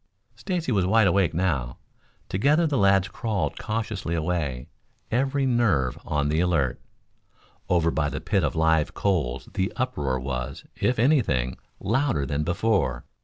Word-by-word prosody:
Stacy 160 Hz, +5 st, -2 dB
was 95 Hz, -5 st, +2 dB
wide 110 Hz, +2 st, +4 dB
awake 95 Hz, -2 st, +3 dB
now. 75 Hz, -9 st, -1 dB, 0.5 s
Together 145 Hz, -, +2 dB
the 150 Hz, -3 st, 0 dB
lads 100 Hz, -1 st, +4 dB
crawled 110 Hz, -2 st, -2 dB
cautiously 110 Hz, -6 st, -3 dB
away, 75 Hz, -6 st, -2 dB, 0.4 s
every 135 Hz, +3 st, +1 dB
nerve 110 Hz, -, +2 dB
on 75 Hz, -1 st, -1 dB
the 75 Hz, +2 st, +1 dB
alert. 85 Hz, -7 st, +1 dB, 0.9 s
Over 85 Hz, -2 st, +3 dB
by 75 Hz, -2 st, 0 dB
the -, -, -4 dB
pit -, -, 0 dB
of -, -, -1 dB
live 80 Hz, -1 st, +2 dB
coals 65 Hz, -10 st, -1 dB
the 95 Hz, 0 st, -1 dB
uproar 75 Hz, -, -1 dB
was, 65 Hz, 0 st, -5 dB
if 125 Hz, -, 0 dB
any 135 Hz, +5 st, +4 dB
thing, 65 Hz, -, -1 dB, 0.2 s
louder 110 Hz, -, 0 dB
than 70 Hz, +3 st, -1 dB
before. 90 Hz, -, 0 dB
90 Hz, 145 wpm, -25 LUFS, 70-115 Hz, 0.9 s, wide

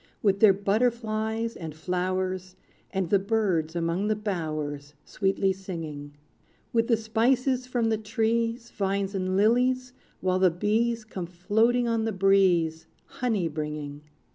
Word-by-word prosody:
With 200 Hz, -2 st, +3 dB
their 215 Hz, -2 st, +8 dB
butterflies 220 Hz, +2 st, 0 dB
and 160 Hz, -3 st, -7 dB
flowers, 185 Hz, +2 st, -2 dB, 0.3 s
And 190 Hz, -3 st, -2 dB
the 200 Hz, -, +5 dB
birds 190 Hz, -6 st, 0 dB
among 170 Hz, +4 st, 0 dB
the 215 Hz, -, +2 dB
bowers 155 Hz, -8 st, -4 dB
Sweetly 195 Hz, -1 st, 0 dB
singing; 160 Hz, -6 st, -7 dB, 0.6 s
With 230 Hz, -1 st, +2 dB
the 230 Hz, -, +3 dB
spices 250 Hz, +4 st, +1 dB
from 240 Hz, -3 st, 0 dB
the 220 Hz, -1 st, 0 dB
trees, 230 Hz, +2 st, -1 dB
Vines, 195 Hz, 0 st, -1 dB
and 185 Hz, -1 st, -1 dB
lilies, 250 Hz, +4 st, +2 dB, 0.3 s
while 185 Hz, 0 st, +1 dB
the 185 Hz, -1 st, +5 dB
bees 215 Hz, +6 st, 0 dB
Come 185 Hz, -5 st, -6 dB
floating 220 Hz, +8 st, +1 dB
on 230 Hz, -1 st, 0 dB
the 225 Hz, -, 0 dB
breeze, 185 Hz, -5 st, +3 dB, 0.3 s
Honey 220 Hz, -8 st, +1 dB
bringing! 150 Hz, -2 st, -5 dB
195 Hz, 135 wpm, -27 LUFS, 180-225 Hz, 0.6 s, their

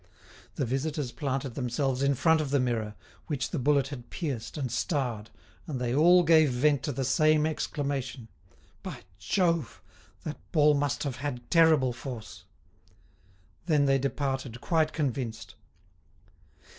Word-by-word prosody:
The 135 Hz, -, -1 dB
visitors 135 Hz, +1 st, -2 dB
planted 135 Hz, -3 st, -3 dB
themselves 130 Hz, +1 st, -1 dB
in 140 Hz, 0 st, +2 dB
front 160 Hz, +4 st, +3 dB
of 150 Hz, -, -3 dB
the 140 Hz, 0 st, +2 dB
mirror, 115 Hz, -4 st, -1 dB, 0.3 s
which 140 Hz, -5 st, -2 dB
the 165 Hz, -, -2 dB
bullet 140 Hz, 0 st, +2 dB
had 125 Hz, -4 st, -8 dB
pierced 135 Hz, -10 st, -4 dB
and 130 Hz, -5 st, -3 dB
starred, 120 Hz, -, -2 dB, 0.4 s
and 140 Hz, -6 st, -3 dB
they 120 Hz, -1 st, -1 dB
all 175 Hz, +5 st, +6 dB
gave 160 Hz, -2 st, +5 dB
vent 140 Hz, +3 st, +2 dB
to 145 Hz, -, -1 dB
the 135 Hz, 0 st, -2 dB
same 155 Hz, +4 st, +3 dB
exclamation: 140 Hz, -5 st, -3 dB, 0.5 s
"By -, -, -7 dB, 0.2 s
Jove; 170 Hz, -, 0 dB, 0.4 s
that 155 Hz, -, -5 dB
ball 150 Hz, -3 st, +5 dB
must 145 Hz, 0 st, 0 dB
have 135 Hz, -3 st, -3 dB
had 125 Hz, -3 st, -5 dB
terrible 160 Hz, -7 st, +5 dB
force!" 120 Hz, -3 st, -8 dB, 1.2 s
Then 150 Hz, -4 st, +3 dB
they 135 Hz, 0 st, +3 dB
departed 135 Hz, -3 st, -2 dB
quite 155 Hz, +2 st, +1 dB
convinced. 130 Hz, -6 st, -3 dB
140 Hz, 140 wpm, -28 LUFS, 125-150 Hz, 1.2 s, all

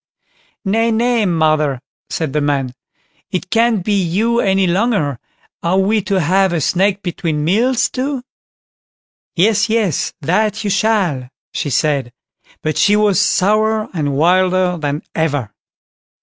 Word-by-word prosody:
"Nay, 225 Hz, +4 st, +1 dB
nay, 230 Hz, -1 st, +1 dB
mother", 155 Hz, -5 st, +1 dB, 0.3 s
said 155 Hz, -5 st, -3 dB
the 150 Hz, -, 0 dB
man, 140 Hz, -3 st, -1 dB, 0.6 s
"it 185 Hz, 0 st, -4 dB
can't 230 Hz, -4 st, +2 dB
be 210 Hz, -, +1 dB
you 215 Hz, +7 st, 0 dB
any 195 Hz, -2 st, +2 dB
longer; 180 Hz, -, 0 dB, 0.4 s
are 170 Hz, +3 st, +1 dB
we 205 Hz, +3 st, +2 dB
to 195 Hz, 0 st, 0 dB
have 185 Hz, +3 st, +2 dB
a 170 Hz, -, 0 dB
snack 195 Hz, +6 st, +1 dB
between 165 Hz, -4 st, -2 dB
meals 235 Hz, +8 st, +2 dB
too?" 265 Hz, 0 st, -3 dB, 1.1 s
"Yes, 210 Hz, +4 st, +2 dB
yes, 215 Hz, -, 0 dB
that 210 Hz, +8 st, 0 dB
you 205 Hz, -, -1 dB
shall", 190 Hz, -, 0 dB, 0.2 s
she 145 Hz, -, -2 dB
said; 140 Hz, -2 st, 0 dB, 0.5 s
but 155 Hz, 0 st, -1 dB
she 205 Hz, -, +4 dB
was 210 Hz, -3 st, +3 dB
sourer 215 Hz, +2 st, +1 dB
and 145 Hz, -5 st, -1 dB
wilder 180 Hz, +2 st, +2 dB
than 145 Hz, -1 st, -3 dB
ever. 145 Hz, -9 st, -1 dB
185 Hz, 135 wpm, -17 LUFS, 155-215 Hz, 1.1 s, she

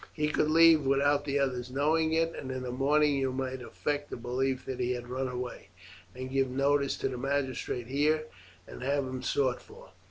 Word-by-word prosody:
He 150 Hz, -1 st, 0 dB
could 150 Hz, -, +1 dB
leave 165 Hz, -1 st, +6 dB
without 140 Hz, +1 st, +2 dB
the 140 Hz, -1 st, 0 dB
others 130 Hz, -3 st, -1 dB
knowing 155 Hz, +4 st, +1 dB
it, 165 Hz, +1 st, +1 dB
and 130 Hz, -, -6 dB
in 130 Hz, 0 st, -4 dB
the 125 Hz, -, -4 dB
morning 145 Hz, +3 st, +2 dB
you 135 Hz, -1 st, 0 dB
might 130 Hz, 0 st, -3 dB
affect 145 Hz, +5 st, -3 dB
a -, -, -4 dB
belief 130 Hz, +2 st, -2 dB
that 130 Hz, -, -5 dB
he 125 Hz, 0 st, 0 dB
has 120 Hz, -1 st, -5 dB
run 130 Hz, +2 st, -3 dB
away, 125 Hz, 0 st, -6 dB, 0.5 s
and 130 Hz, +1 st, -6 dB
give 135 Hz, -1 st, +1 dB
notice 140 Hz, +1 st, +1 dB
to -, -, -1 dB
the 125 Hz, -, -5 dB
magistrate 135 Hz, -3 st, -2 dB
here 150 Hz, +5 st, +1 dB, 0.4 s
and -, -, -10 dB
have 140 Hz, +1 st, 0 dB
him 130 Hz, 0 st, -5 dB
sought 130 Hz, -1 st, 0 dB
for. -, -, -15 dB
135 Hz, 200 wpm, -30 LUFS, 130-145 Hz, 0.5 s, leave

